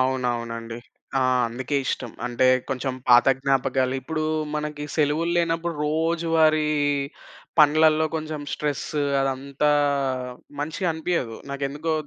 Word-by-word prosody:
అవునవునండి. 120 -3 -1 0.5
ఆ! - - +3 0.3
అందుకే 130 +4 -3
ఇష్టం. 125 -3 -2 0.2
అంటే 120 +1 0 0.3
కొంచెం 130 0 -2
పాత 120 +1 +7
జ్ఞాపకాలు. 135 -1 +1
ఇప్పుడు 155 +3 -3 0.3
మనకి 150 -1 -3
సెలవుల్లేనప్పుడు 165 +2 +1
రోజువారీ 160 0 +2 1.0
పనులల్లో 155 +1 +5
కొంచెం 155 -1 -4
స్ట్రెస్ 150 -2 -2 0.3
అదంతా 135 +2 0 0.9
మంచిగనిపియ్యదు. 160 - -2
నాకెందుకో 140 +3 -2
150 Hz, 90 wpm, -24 LUFS, 130-160 Hz, 1.0 s, పాత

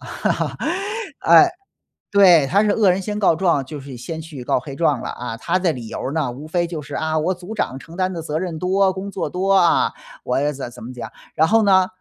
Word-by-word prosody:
哎， - - -9 2.0
对。 180 -8 +6
他 200 +8 +3
是 210 - +2
恶 205 -3 +4
人 185 +2 -1
先 210 +2 -4
告 195 - +4
状， 165 -5 +1
就 150 +2 -8
是 135 -1 -9
先 160 +7 -6
去 155 -5 -8
告 120 - +1
黑 135 +2 -9
状 150 -4 +1
了， - - -5
啊， 120 -2 -6
他 170 +9 0
的 180 -2 +1
理 120 -6 -7
由 - - -6
儿 130 - -3
呢， 150 -4 -1
无 135 +5 -9
非 175 +1 0
就 165 -3 -5
是， 145 0 -8
啊， 160 0 -1
我 175 +5 0
组 180 +4 -9
长 130 -10 -2
承 165 +4 -13
担 185 0 0
的 170 -3 -5
责 155 -1 -3
任 170 -2 -4
多、 190 +2 +2
工 190 +2 -6
作 195 - -3
多， 190 +2 0
啊， 180 -3 +4 0.3
我 140 +4 +1
怎 135 -3 -6
怎 - - -12
么 120 - -7
讲。 120 -3 -7 0.3
然 160 - +4
后 225 +6 +4
呢， 190 -3 +4
165 Hz, 250 characters per minute, -21 LUFS, 140-185 Hz, 2.0 s, 对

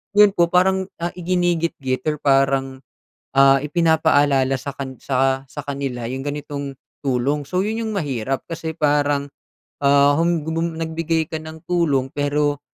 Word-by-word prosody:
yon 210 -1 +7
po 170 -1 +4
parang, 190 +1 +3
ah, 170 +1 -1
iginigitgit 170 -7 -1
or 150 - -1
parang, 135 -1 +2 0.6
ah, 135 0 +7
ipinapaalala 145 -4 +2
sa 140 +1 -5
kan 130 -2 -6
sa 135 0 +1
sa 145 - -6
kanila 135 -4 -4
yung 130 +1 -4
ganitong 145 -2 -5 0.3
tulong. 140 +3 0
So, 185 0 +1
yon 220 +2 -2
yung 220 - -3
mahirap 135 - -2
kasi 160 -1 -5
parang, 145 -1 +2 0.6
ah, 140 0 +5
hum 165 -2 +1
gubum 165 0 -2
nagbigay 165 0 -1
ka 160 - -3
ng 160 0 -10
tulong 150 -7 +1
pero 145 0 0
145 Hz, 145 wpm, -21 LUFS, 135-165 Hz, 0.6 s, yon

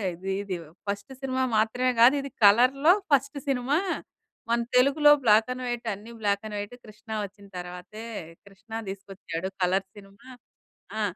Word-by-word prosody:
ఇది 190 +3 -5
ఇది 195 -2 -3 0.3
first 200 +3 -4
cinema 260 -1 -1
మాత్రమే 245 +4 +2
కాదిది 275 +3 +5 0.2
కలర్‌లో 255 - +6 0.2
ఫస్ట్ 280 +1 +2
సినిమా. 270 +2 +1 0.7
మన 235 +1 +2 0.2
తెలుగులో 280 +4 +6
బ్లాక్ 220 0 +5
అండ్ 255 0 -7
వైట్ 240 -1 -3
అన్నీ 210 +4 -10
బ్లాక్ 200 -1 +1
అండ్ 210 -1 -5
వైటే 205 +4 -6
'కృష్ణ' 215 0 -7
వచ్చిన 200 +1 -14
తర్వాతే 180 +5 -8 0.4
'కృష్ణ' 200 +3 -8
తీసుకొచ్చాడు 195 -2 -6
కలర్ 190 +2 +1
సినిమా 195 +3 -15 0.7
ఆ! - - 0
220 Hz, 140 wpm, -27 LUFS, 200-255 Hz, 0.7 s, కలర్‌లో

